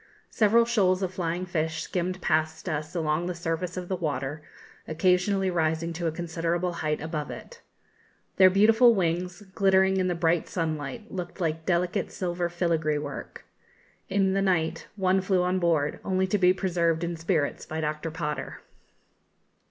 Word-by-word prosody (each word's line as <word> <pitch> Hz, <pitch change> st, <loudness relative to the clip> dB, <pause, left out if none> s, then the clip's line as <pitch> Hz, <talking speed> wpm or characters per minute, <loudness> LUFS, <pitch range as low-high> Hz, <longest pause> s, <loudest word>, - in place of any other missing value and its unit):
Several 230 Hz, +2 st, +4 dB
shoals 195 Hz, -5 st, +2 dB
of 185 Hz, 0 st, -2 dB
flying 175 Hz, 0 st, -2 dB
fish 160 Hz, -2 st, -2 dB
skimmed 180 Hz, 0 st, -3 dB
past 155 Hz, +2 st, 0 dB
us 155 Hz, 0 st, -3 dB
along 160 Hz, +1 st, 0 dB
the 180 Hz, -, -3 dB
surface 170 Hz, +1 st, -3 dB
of 180 Hz, -1 st, -4 dB
the 190 Hz, -, -1 dB
water, 150 Hz, -3 st, -3 dB, 0.5 s
occasionally 185 Hz, +3 st, +2 dB
rising 165 Hz, 0 st, 0 dB
to 170 Hz, 0 st, -2 dB
a -, -, 0 dB
considerable 170 Hz, +1 st, -2 dB
height 150 Hz, -1 st, 0 dB
above 155 Hz, -1 st, -4 dB
it. 480 Hz, 0 st, -10 dB, 0.8 s
Their 185 Hz, -1 st, +8 dB
beautiful 220 Hz, +5 st, +5 dB
wings, 180 Hz, +1 st, -1 dB
glittering 190 Hz, -1 st, +3 dB
in 185 Hz, -1 st, +1 dB
the 175 Hz, -, 0 dB
bright 165 Hz, 0 st, +1 dB
sunlight, 160 Hz, -, -4 dB
looked 180 Hz, 0 st, -6 dB
like 160 Hz, -2 st, -2 dB
delicate 180 Hz, +2 st, 0 dB
silver 175 Hz, -1 st, -2 dB
filigree 165 Hz, -3 st, 0 dB
work. 145 Hz, -1 st, -7 dB, 0.6 s
In 190 Hz, 0 st, +2 dB
the 195 Hz, -, +1 dB
night 180 Hz, -5 st, 0 dB
one 190 Hz, -1 st, +2 dB
flew 185 Hz, -1 st, +1 dB
on 180 Hz, +1 st, +1 dB
board, 160 Hz, -4 st, +1 dB
only 190 Hz, -1 st, +1 dB
to 200 Hz, +2 st, 0 dB
be 180 Hz, -1 st, +5 dB
preserved 170 Hz, -3 st, 0 dB
in 170 Hz, 0 st, -2 dB
spirits 165 Hz, -3 st, -1 dB
by 160 Hz, -, -4 dB
Dr. 155 Hz, +1 st, -2 dB
Potter. 155 Hz, -2 st, -4 dB
175 Hz, 160 wpm, -27 LUFS, 160-185 Hz, 0.8 s, Their